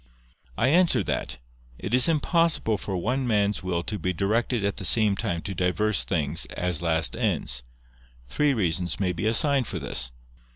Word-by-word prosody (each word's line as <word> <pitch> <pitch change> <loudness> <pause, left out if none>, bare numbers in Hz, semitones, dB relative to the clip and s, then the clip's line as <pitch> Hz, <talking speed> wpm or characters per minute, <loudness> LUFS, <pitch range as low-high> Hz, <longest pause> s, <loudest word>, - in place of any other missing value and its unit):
I 125 - +2
answer 175 +3 +4
that, - - -3 0.4
It - - -5
is 125 +4 +5
impossible 160 - +1
for 95 -2 -3
one 125 +8 -1
man's 105 -3 +1
will 90 -2 -2
to 105 +2 -4
be 90 - -1
directed 110 +4 0
at 100 - -1
the - - -5
same 105 +1 +3
time 90 -6 -3
to 100 - -4
diverse 95 +3 +1
things, 80 -6 0
as 90 -4 -2
last 80 -1 0
ends. 85 - 0 0.7
Three 145 - +1
reasons 90 -4 -1
may 90 -3 0
be 90 +5 -2
assigned 130 +2 +2
for - - -4
this. 65 -2 -3
100 Hz, 170 wpm, -25 LUFS, 90-120 Hz, 0.7 s, is